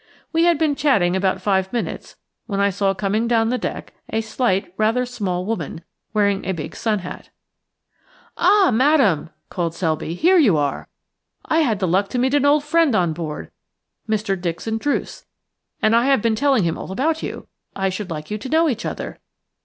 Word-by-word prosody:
We 330 Hz, +1 st, +3 dB
had 345 Hz, -2 st, +4 dB
been 310 Hz, -1 st, +2 dB
chatting 255 Hz, -, +2 dB
about 190 Hz, 0 st, 0 dB
five 190 Hz, -1 st, +1 dB
minutes 240 Hz, -, -4 dB, 0.3 s
when 200 Hz, -3 st, -2 dB
I 200 Hz, 0 st, +3 dB
saw 195 Hz, 0 st, 0 dB
coming 205 Hz, +4 st, 0 dB
down 225 Hz, -1 st, +2 dB
the 250 Hz, +1 st, 0 dB
deck -, -, -5 dB, 0.2 s
a 225 Hz, -, 0 dB
slight, 220 Hz, -5 st, -1 dB
rather 225 Hz, +4 st, +1 dB
small 195 Hz, -8 st, -3 dB
woman, 175 Hz, -6 st, -4 dB, 0.3 s
wearing 200 Hz, -2 st, +1 dB
a 190 Hz, -, -2 dB
big 160 Hz, 0 st, -6 dB
sun 220 Hz, -2 st, 0 dB
hat. -, -, -8 dB, 1.1 s
"Ah, 390 Hz, -1 st, +4 dB
Madame," 245 Hz, -, +3 dB, 0.2 s
cried 170 Hz, -2 st, -2 dB
Selby, 160 Hz, -1 st, -2 dB
"here 360 Hz, -, +4 dB
you 210 Hz, -, +4 dB
are. 145 Hz, -2 st, -2 dB, 0.6 s
I 320 Hz, -, +2 dB
had 240 Hz, -10 st, +2 dB
the 190 Hz, -1 st, -1 dB
luck 190 Hz, +4 st, +2 dB
to -, -, -3 dB
meet 260 Hz, +2 st, +1 dB
an 285 Hz, -1 st, +3 dB
old 290 Hz, +1 st, +4 dB
friend 315 Hz, -4 st, +2 dB
on 175 Hz, -5 st, +2 dB
board 155 Hz, -2 st, -6 dB, 0.3 s
– -, -, -32 dB
Mr. 210 Hz, -2 st, 0 dB
Dixon 185 Hz, +6 st, -3 dB
Druce 290 Hz, +4 st, -2 dB, 0.3 s
– -, -, -51 dB
and 215 Hz, +1 st, +4 dB
I 235 Hz, +3 st, +3 dB
have 270 Hz, -6 st, +3 dB
been 230 Hz, -1 st, +2 dB
telling 265 Hz, -2 st, +2 dB
him 165 Hz, -1 st, -1 dB
all -, -, -7 dB
about 310 Hz, +10 st, 0 dB
you. -, -, -6 dB, 0.3 s
I 195 Hz, 0 st, 0 dB
should 190 Hz, +1 st, -5 dB
like 155 Hz, 0 st, -6 dB
you 210 Hz, -, -2 dB
to 260 Hz, -, -7 dB
know 325 Hz, +3 st, +3 dB
each 240 Hz, -6 st, -2 dB
other. -, -, -6 dB
215 Hz, 195 wpm, -21 LUFS, 185-265 Hz, 1.1 s, had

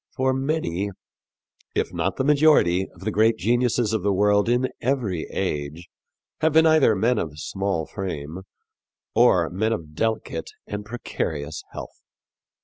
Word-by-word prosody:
For 130 Hz, 0 st, +1 dB
many, 135 Hz, -, -1 dB, 0.9 s
if -, -, -1 dB
not 90 Hz, +2 st, -1 dB
the 130 Hz, -, -1 dB
majority, 140 Hz, -, +4 dB
of 85 Hz, -, -17 dB
the 110 Hz, +3 st, -2 dB
great 110 Hz, +2 st, +3 dB
geniuses 120 Hz, -1 st, +1 dB
of 110 Hz, -, 0 dB
the 100 Hz, +2 st, +1 dB
world 105 Hz, +2 st, +3 dB
in 125 Hz, +2 st, +2 dB
every 115 Hz, -, -1 dB
age 75 Hz, +4 st, -3 dB, 0.5 s
have 160 Hz, -1 st, +2 dB
been 160 Hz, +1 st, +6 dB
either 155 Hz, -8 st, +5 dB
men 115 Hz, +4 st, +2 dB
of 75 Hz, -2 st, -4 dB
small 95 Hz, +1 st, -2 dB
frame 80 Hz, -3 st, -5 dB, 0.7 s
or -, -, +4 dB
men 110 Hz, +5 st, 0 dB
of 80 Hz, -7 st, -6 dB
delicate 105 Hz, -2 st, -2 dB, 0.2 s
and 105 Hz, 0 st, -5 dB
precarious 80 Hz, -9 st, -4 dB
health. -, -, -9 dB
105 Hz, 140 wpm, -24 LUFS, 85-125 Hz, 0.9 s, been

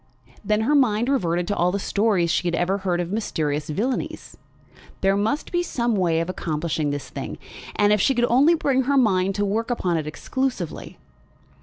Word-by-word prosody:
Then 215 Hz, 0 st, +1 dB
her 260 Hz, +7 st, +1 dB
mind 240 Hz, -4 st, +3 dB
reverted 175 Hz, -10 st, 0 dB
to 205 Hz, -, 0 dB
all 175 Hz, +1 st, +2 dB
the 200 Hz, -, -1 dB
stories 200 Hz, -4 st, +1 dB
she 175 Hz, -, 0 dB
had 170 Hz, -, 0 dB
ever 185 Hz, +4 st, 0 dB
heard 180 Hz, -2 st, -1 dB
of 175 Hz, 0 st, -3 dB
mysterious 155 Hz, -8 st, -2 dB
villanies. 230 Hz, -, -3 dB, 0.7 s
There 195 Hz, 0 st, +3 dB
must 220 Hz, +9 st, -1 dB
be 350 Hz, -, +1 dB
some 240 Hz, -8 st, -1 dB
way 170 Hz, -4 st, +1 dB
of 165 Hz, -, -2 dB
accomplishing 155 Hz, -3 st, -2 dB
this 145 Hz, -2 st, -4 dB
thing, 125 Hz, -, -6 dB, 0.4 s
if 205 Hz, -1 st, +4 dB
she 270 Hz, -, +3 dB
could 240 Hz, 0 st, +3 dB
only 275 Hz, +8 st, +4 dB
bring 265 Hz, -5 st, +1 dB
her 280 Hz, +1 st, +2 dB
mind 195 Hz, -6 st, +2 dB
to 205 Hz, -, 0 dB
work 220 Hz, +4 st, -1 dB
upon 180 Hz, -8 st, 0 dB
it 155 Hz, -1 st, -3 dB
exclusively. 245 Hz, -, -4 dB
200 Hz, 185 wpm, -23 LUFS, 175-240 Hz, 0.7 s, if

